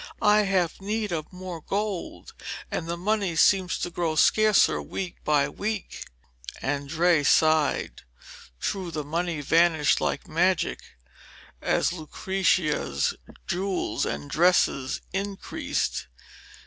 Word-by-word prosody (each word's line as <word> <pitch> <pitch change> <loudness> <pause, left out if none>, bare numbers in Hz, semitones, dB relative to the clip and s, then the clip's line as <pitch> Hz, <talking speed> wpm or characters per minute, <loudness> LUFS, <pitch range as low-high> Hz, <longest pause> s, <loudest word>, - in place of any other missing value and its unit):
I 210 0 +4
have 185 -3 0
need 210 0 -2
of 155 -3 -4
more 180 -2 -7
gold, 200 +1 -4 0.4
and 165 - -3
the 170 +1 -3
money 200 -1 0
seems 185 +2 +3
to 175 - -3
grow 165 -2 -1
scarcer 215 +6 +4
week 185 -3 -6
by 145 -2 +2
week.' 210 +7 -4 0.5
Andrea 145 +4 +1
sighed. 155 0 +2 0.6
Truly 185 - -3
the 155 -2 -4
money 165 +1 -2
vanished 160 0 +3
like - - -2
magic, 180 +2 +1 0.8
as - - +1
Lucrezia's 155 - 0 0.3
jewels 190 +1 -1
and 70 0 -4
dresses 165 -6 +2
increased. 195 - -3
175 Hz, 110 wpm, -26 LUFS, 155-195 Hz, 0.8 s, I